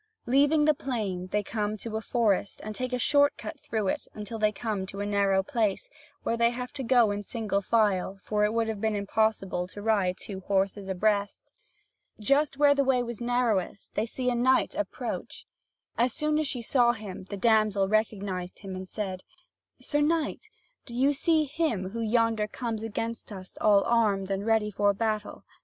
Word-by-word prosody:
Leaving 290 +4 +4
the 305 - +5
plain, 210 -10 -3
they 205 +2 -1
come 210 0 -2
to 220 +1 -6
a 220 - -1
forest 210 -4 0
and 215 - -5
take 255 +3 -4
a 250 - 0
short 285 +3 +3
cut 320 - -7
through 215 -6 -2
it - - -2
until 215 +2 -6
they 215 0 +3
come 215 -2 -3
to 195 +1 -7
a 205 - -1
narrow 200 -2 +2
place, 225 - -1 0.4
where 230 - 0
they 235 0 +3
have 250 +1 -5
to 285 - -4
go 240 -4 +4
in 205 0 -2
single 205 -2 -2
file; 200 -2 +1
for 210 -1 0
it 210 - +3
would 230 0 0
have 220 -2 -4
been 220 -1 +1
impossible 200 -3 0
to 195 - -10
ride 205 -4 +1
two 195 -2 -7
horses 195 +1 -1
abreast. 200 +2 -1 0.7
Just 275 +6 +2
where 290 0 +6
the 280 -1 +2
way 260 -2 +2
was 235 -1 -6
narrowest, 235 -6 -1
they 220 - -1
see 250 +2 -1
a - - +1
knight 255 +2 +2
approach. - - -4 0.5
As 240 0 +3
soon 305 0 +1
as 310 - 0
she 245 -3 -2
saw 240 0 +3
him, 205 -4 -8
the 200 +1 -6
damsel 215 -2 +3
recognised 200 -4 -1
him, 195 -2 -6
and 185 0 -6
said: 190 -4 -4 0.6
"Sir 295 0 0
knight, 325 +7 0 0.4
do 235 - -7
you 270 +4 +3
see 315 +2 +2
him 275 - -1
who 230 +2 -4
yonder 225 -1 +2
comes 225 -1 -4
against 225 +1 -4
us 185 -2 -8
all 205 -2 +5
armed 205 -5 +1
and 195 +2 -2
ready 220 -1 +2
for 205 +1 +2
a 200 - +1
battle? 215 0 -2
220 Hz, 190 wpm, -28 LUFS, 200-245 Hz, 0.7 s, where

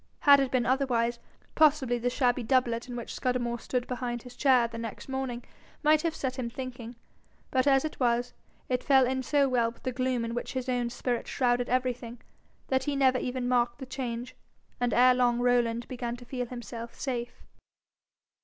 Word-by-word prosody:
Had 285 -3 +7
it 270 -1 +1
been 250 -1 +1
otherwise, 240 -2 +1 0.3
possibly 280 -6 +3
the 245 +1 0
shabby 250 0 +1
doublet 240 -1 +1
in 245 - -5
which 235 - -6
Scudamore 240 -2 -1
stood 250 +1 -2
behind 245 -2 -4
his 250 0 -12
chair 255 -3 +4
the 230 0 -8
next 230 -2 -7
morning, 265 -3 -3 0.4
might 305 0 +5
have 330 -1 -1
set 260 -1 -3
him 235 -2 -2
thinking; 245 -1 -7 0.6
but 260 +1 +2
as 270 +1 +4
it 310 - -5
was, 245 -1 +1 0.3
it 250 -1 -1
fell 265 -3 +5
in 260 +1 -1
so 280 +2 +2
well 240 -3 +2
with 230 - -16
the 255 - -1
gloom 255 -1 -1
in 230 - -4
which 240 - -4
his 260 -1 -3
own 245 -2 0
spirit 245 0 -2
shrouded 245 -1 +1
everything, 245 -2 -1 0.5
that 265 0 0
he 290 -1 -1
never 260 -2 +3
even 250 0 -3
marked 240 -1 +1
the 270 - -7
change, 250 -2 -5 0.4
and 245 -1 +1
ere 250 +1 +6
long 245 -1 +2
Rowland 240 -1 +1
began 240 -2 -4
to 245 0 -12
feel 250 0 -4
himself 235 -1 -7
safe. 240 -3 -4
250 Hz, 190 wpm, -29 LUFS, 240-260 Hz, 0.6 s, Had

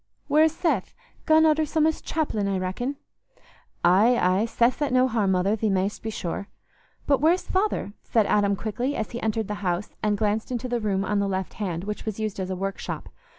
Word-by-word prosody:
Where's 310 +1 +4
Seth? 300 - -1 0.3
Gone 315 0 +6
arter 310 0 +4
some 310 +1 +1
o's 320 0 0
chapellin', 250 -11 -1
I 195 -1 0
reckon?" 190 +9 -3 0.9
"Aye, 210 +8 +5
aye, 185 +4 +2
Seth's 240 +5 +1
at 290 - +1
no 255 0 +4
harm, 220 -6 +1
mother, 190 +3 +2
thee 220 0 0
mayst 195 +1 0
be 220 - -4
sure. 200 -2 -4 0.6
But 280 -3 +2
where's 335 +4 +3
father?" 380 - 0
said 225 -3 +2
Adam 200 -1 +2
quickly, 240 +7 -2
as 220 - -3
he 240 - -5
entered 220 -1 -1
the 210 -1 -5
house 180 +1 -1
and 210 -1 +1
glanced 215 +3 -1
into 250 0 -2
the 240 -1 -1
room 195 -3 0
on 205 +1 0
the 200 - +1
left 190 -1 -3
hand, 180 -5 -3
which 210 +1 -5
was 220 -1 -4
used 215 -2 -3
as 185 -1 -3
a 185 - -2
workshop. 195 +1 -4
215 Hz, 205 wpm, -25 LUFS, 195-255 Hz, 0.9 s, Gone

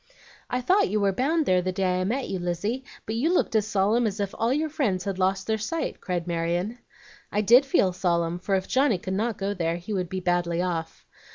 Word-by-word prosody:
"I 250 - -1
thought 370 - +3
you 210 +2 +1
were 200 -1 +2
bound 295 - +1
there 185 -4 +3
the 185 +1 -1
day 185 -1 0
I - - +1
met 250 +7 -1
you, 190 - -3
Lizzie; 180 +9 -2 0.2
but 220 - -3
you 265 +9 +1
looked 360 - +1
as 215 -1 +2
solemn 215 +3 +2
as 205 0 -4
if 200 -1 -2
all 230 +2 0
your 305 +4 +1
friends 235 - -1
had 195 -1 -3
lost 190 +1 +1
their 220 -1 0
sight," 315 +10 -3
cried 175 -2 -2
Marion. 175 +6 -2 0.5
"I 205 - +1
did 240 +6 +6
feel 190 -8 +3
solemn, 170 -1 0
for 195 +2 0
if 190 -1 -1
Johnny 260 -5 +2
could 185 +1 -5
not 220 +2 -1
go 200 +1 -2
there 165 -3 -1
he 175 +5 -6
would 180 -3 -2
be 190 - -3
badly 175 -1 0
off. 170 -3 -3
195 Hz, 235 wpm, -26 LUFS, 180-230 Hz, 0.5 s, did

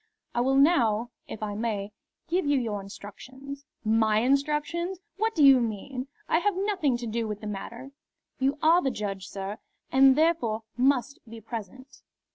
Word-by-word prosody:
I 240 - +1
will 265 +2 +2
now, 245 -6 +3 0.2
if 215 - -7
I 210 -1 -2
may, 210 -2 -2 0.4
give 350 -1 0
you 285 -1 +3
your 215 -4 -3
instructions." 260 +8 -10 0.2
"My 220 0 +3
instructions! 300 +7 0 0.2
What 445 +2 0
do 310 - +4
you 270 -2 +8
mean? 245 +4 -3 0.2
I 320 - +3
have 405 +1 +1
nothing 375 - +1
to 240 - -6
do 225 0 -2
with 210 -1 -4
the 215 - -9
matter." 235 +6 -6 0.5
"You 270 +2 +1
are 335 +3 +6
the 270 - +1
judge, 200 -5 -4
sir, 195 +1 -6 0.3
and 265 0 +6
therefore 300 -9 +1
must 270 +1 +1
be 230 0 -9
present." 230 +4 -8
255 Hz, 165 wpm, -27 LUFS, 215-285 Hz, 0.5 s, you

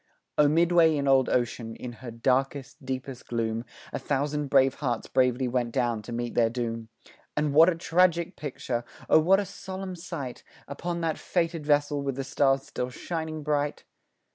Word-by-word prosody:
O 150 - +5
midway 165 +1 +4
in 140 -1 -1
old 135 -2 +4
ocean, 120 -2 -1
in 125 - -7
her 125 - -6
darkest, 130 +3 -1
deepest 130 -1 -5
gloom, 115 -1 -1 0.3
A - - -2
thousand 145 +1 -1
brave 135 -1 +4
hearts 125 -5 -1
bravely 125 0 +2
went 120 -1 0
down 120 -3 0
to 105 - -9
meet 120 0 -3
their 115 -1 +3
doom, 115 -1 -4 0.5
And 150 -1 +1
what 160 +4 +8
a 180 - 0
tragic 170 +1 +2
picture! 130 -4 -3 0.2
Oh, - - +6
what 185 +5 +5
a 205 - -1
solemn 190 -1 -6
sight 165 -7 -6 0.2
Upon 170 +4 -4
that 160 -1 -1
fated 165 -3 -1
vessel 145 -1 +2
with 135 -2 -2
the 135 - -3
stars 135 0 +2
still 125 -2 -4
shining 160 +2 -4
bright! 145 -1 -1
140 Hz, 170 wpm, -27 LUFS, 125-160 Hz, 0.5 s, what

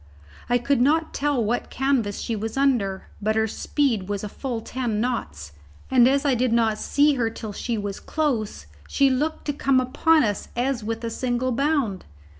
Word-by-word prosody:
I 245 - +4
could 245 +1 +1
not 315 +5 +2
tell 280 -5 0
what 240 +3 -1
canvas 255 -6 0
she 230 - -2
was 220 +3 -4
under, 235 -9 +1
but 215 +1 +1
her 220 0 +2
speed 225 -4 -1
was 205 0 -2
a 210 - -4
full 245 +1 -4
ten 230 -2 -3
knots, 75 - -3 0.4
and 250 -2 +6
as 275 +2 +2
I 280 - +3
did 250 0 +1
not 225 -2 +2
see 290 +1 +3
her 240 -4 0
till 220 -2 -7
she 235 +2 -3
was 205 -1 -4
close, 270 -10 -2 0.2
she 275 -1 +3
looked 295 +5 -1
to 290 - -1
come 275 -2 +2
upon 305 +5 +3
us 205 -3 -2
as 245 -1 -1
with 225 +2 -4
a 230 - -3
single 250 +1 -1
bound. 270 - 0
245 Hz, 190 wpm, -24 LUFS, 220-275 Hz, 0.4 s, and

